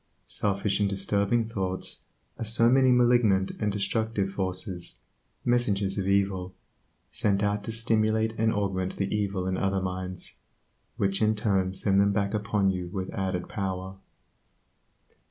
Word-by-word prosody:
Selfish 100 0 0
and 100 -1 +2
disturbing 100 +3 +1
thoughts 95 -4 -2 0.3
are - - -2
so 115 +1 +4
many 130 0 +5
malignant 120 -6 +4
and 105 -1 0
destructive 105 0 -1
forces, 90 -2 -4 0.5
messengers 105 -5 +1
of 95 - -2
evil, 95 -2 0 0.6
sent 100 -1 +1
out 105 0 0
to - - -3
stimulate 110 0 +1
and 110 0 +3
augment 95 -3 -1
the 100 +1 -1
evil 100 -3 -1
in 95 0 -1
other 95 0 0
minds, 95 -1 -5 0.6
which 95 0 0
in 110 0 +3
turn 95 -3 +1
send 100 +1 +2
them 100 0 +3
back 100 0 0
upon 105 -2 +1
you 90 -1 -4
with 95 +1 -4
added 95 -2 -2
power. 95 -1 -4
100 Hz, 140 wpm, -27 LUFS, 95-110 Hz, 0.6 s, many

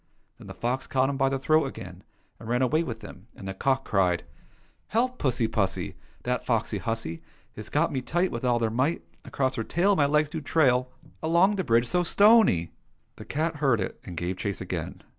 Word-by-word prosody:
Then - - -12
the - - -9
fox 125 +2 -2
caught 135 +1 +1
him 135 - -4
by 135 0 +2
the 135 - -1
throat 155 +3 +3
again, 90 -7 -9 0.4
and 115 - -9
ran 125 +2 +2
away 140 +6 +2
with 115 -8 -5
him, 100 0 -11
and 95 - -9
the 95 - -3
cock 130 +7 0
cried: 90 -4 +1 0.3
'' - - -37
Help 240 +4 +1
I 255 - -24
pussy 125 -4 +1
pussy! 110 -4 -1 0.3
That 125 0 -1
foxy 115 -3 -1
hussy 115 -7 -3 0.3
Has - - -8
got - - +1
me 130 - -2
tight 175 +7 0
With 115 - -5
all 120 -1 +2
her 110 -1 +1
might. 130 +8 0 0.2
Across 130 -1 -1
her 115 - -1
tail 190 - +2
My 145 -5 +3
legs 150 +1 +2
do 160 +1 -5
trail 130 -5 +2 0.3
Along 170 +6 +3
the 190 - -1
bridge 115 -2 +3
so 180 +7 +1
stony 200 - +4
.' - - -41
" - - -44
The - - -10
cat 155 +2 -2
heard 135 -6 +2
it, 95 - -4
and 90 -2 -9
gave 90 +2 -2
chase 100 -3 -3
again. - - -5
130 Hz, 220 wpm, -27 LUFS, 110-155 Hz, 0.4 s, stony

